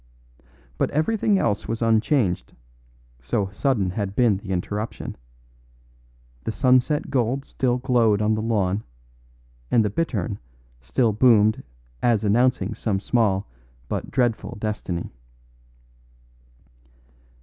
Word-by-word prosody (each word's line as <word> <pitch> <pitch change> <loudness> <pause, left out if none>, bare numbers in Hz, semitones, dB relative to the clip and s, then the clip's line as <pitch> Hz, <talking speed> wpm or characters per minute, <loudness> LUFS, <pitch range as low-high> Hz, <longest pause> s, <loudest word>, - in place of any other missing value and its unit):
But - - +2
everything 205 +6 +1
else 105 - 0
was 115 +1 -2
unchanged, 110 - +1 0.7
so 95 - -2
sudden 100 -4 0
had 100 0 -3
been 115 -5 +3
the 100 0 -10
interruption. 100 +4 -3 1.3
The - - -2
sunset 130 +4 +2
gold 130 +1 0
still 125 -2 0
glowed 120 -5 +2
on 105 +1 +2
the 110 - -1
lawn, 105 -3 0 0.9
and 115 -2 +3
the 105 - -1
bittern 105 - -2 0.4
still 65 - +1
boomed 110 -2 +4 0.4
as 115 -3 +2
announcing 110 -1 +2
some 105 -3 -1
small 100 -3 +1 0.4
but - - -3
dreadful 120 -5 -1
destiny. 105 -5 -3
110 Hz, 105 wpm, -23 LUFS, 100-125 Hz, 1.3 s, boomed